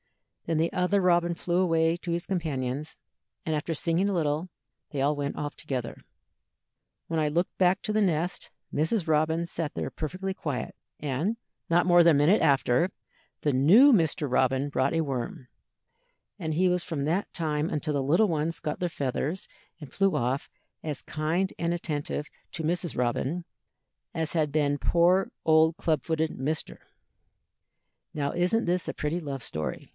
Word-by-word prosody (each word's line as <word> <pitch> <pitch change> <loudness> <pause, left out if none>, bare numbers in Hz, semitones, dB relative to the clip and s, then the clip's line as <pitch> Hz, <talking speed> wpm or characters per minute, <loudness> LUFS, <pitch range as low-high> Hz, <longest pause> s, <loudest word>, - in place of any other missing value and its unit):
Then 165 -1 +1
the 165 +2 +1
other 185 +2 +2
robin 175 -2 +3
flew 175 +1 0
away 165 -2 +3
to 175 0 -5
his 170 0 -2
companions, 150 -5 -3 0.5
and 160 - 0
after 150 +2 -2
singing 170 +6 +1
a - - 0
little, 160 0 0 0.4
they 145 - -4
all 145 +2 +2
went 145 0 -3
off 145 0 -4
together. 130 -5 -5 1.1
"When 165 -1 -1
I 150 - +1
looked 170 +4 -1
back 185 +1 +3
to 215 - -1
the 215 - +2
nest, 175 -2 0 0.2
Mrs. 160 +5 0
Robin 160 +2 +2
sat 165 -3 -4
there - - -2
perfectly 185 +5 -4
quiet, 145 -8 -4 0.2
and, 150 - -1 0.3
not 170 +1 +4
more 175 -1 +6
than 165 -2 +6
a - - +2
minute 170 +9 +4
after, 135 +3 +3 0.5
the 145 - +1
new 200 - +7
Mr. 160 - +2
Robin 130 +2 +2
brought 135 0 0
a 165 - +1
worm, 135 +1 -4 0.9
and 160 -5 -3
he 185 +3 +3
was 180 -1 +1
from 145 -5 -3
that 175 +7 -1
time 155 -2 -1
until 150 0 -1
the 140 -1 0
little 170 +11 +4
ones 165 -1 -1
got 155 -3 -4
their 180 - 0
feathers 145 +4 -3 0.3
and 145 -5 -11
flew 195 -1 +2
off 125 +3 -1 0.3
as 150 -3 -4
kind 165 +5 -1
and 170 0 0
attentive 150 -3 -3 0.3
to 160 - -4
Mrs. 170 -1 -1
Robin 130 +7 -1 0.7
as 160 -1 -2
had 155 -3 +1
been 145 -1 +1
poor 180 +5 +3
old 160 +1 +4
club 155 -4 +1
footed 160 -1 0
Mr. 150 +4 -3 1.4
"Now 145 -2 -1
isn't 180 +6 +1
this 180 0 0
a - - -3
pretty 150 +4 -2
love 140 -5 -5
story?" 80 -1 -4
160 Hz, 170 wpm, -27 LUFS, 145-175 Hz, 1.4 s, new